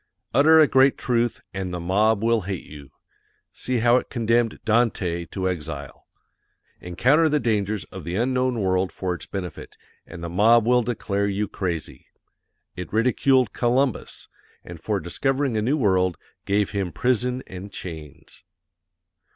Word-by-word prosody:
Utter 155 +5 +6
a 155 - +8
great 135 -1 +4
truth 120 -1 -1
AND 95 -2 -4
THE 90 - -4
MOB 105 +5 +1
WILL 115 -1 +2
HATE 95 -1 -5
YOU. 70 -3 -12 0.6
See 130 -1 -2
how 120 +1 +6
it - - -3
condemned 115 -1 +1
DANTE 105 -7 0
to 95 -2 -4
EXILE. 75 -6 -5 0.7
Encounter 130 - +2
the 150 0 +2
dangers 105 - -1
of - - -8
the 85 +2 -4
unknown 125 +1 0
world 95 -1 0
for 90 -1 -3
its 90 - -8
benefit, 90 -5 -7 0.3
AND 85 - -10
THE - - -3
MOB 110 +6 +4
WILL 125 +1 +4
DECLARE 100 -4 -2
YOU 100 +1 -1
CRAZY. 85 -4 -5 0.7
It 90 - -7
ridiculed 125 +1 +2
COLUMBUS, 125 -1 -1 0.4
and 85 -2 -11
for 105 +2 -1
discovering 135 +8 -1
a 110 - +1
new 130 +8 +1
world 95 - +1 0.3
GAVE 100 0 +1
HIM 100 -4 -2
PRISON 125 +1 0
AND 95 +2 -9
CHAINS. 80 -4 -10
105 Hz, 150 wpm, -23 LUFS, 90-125 Hz, 0.7 s, a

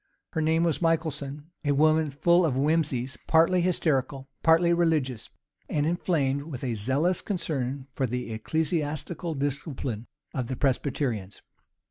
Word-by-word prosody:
Her 160 - 0
name 160 +1 +2
Michelson, 160 -2 -1
a 145 -1 +2
woman 155 +2 +3
full 170 +5 +3
of 150 -6 +1
whimseys 140 -3 +1
partly 165 +3 +4
hysterical, 140 -6 0
partly 165 +1 +5
religious; 155 -9 0 0.4
and 145 -1 +1
inflamed 155 -5 +1
with 140 -6 -7
a 125 -3 -1
zealous 135 - +1
concern 140 - -2
for 130 - 0
the 125 -1 -3
ecclesiastical 160 +6 -2
discipline 135 -5 -3 0.3
of 130 -5 -2
the 130 - -3
Presbyterians. 125 -6 -1
145 Hz, 125 wpm, -27 LUFS, 130-165 Hz, 0.4 s, partly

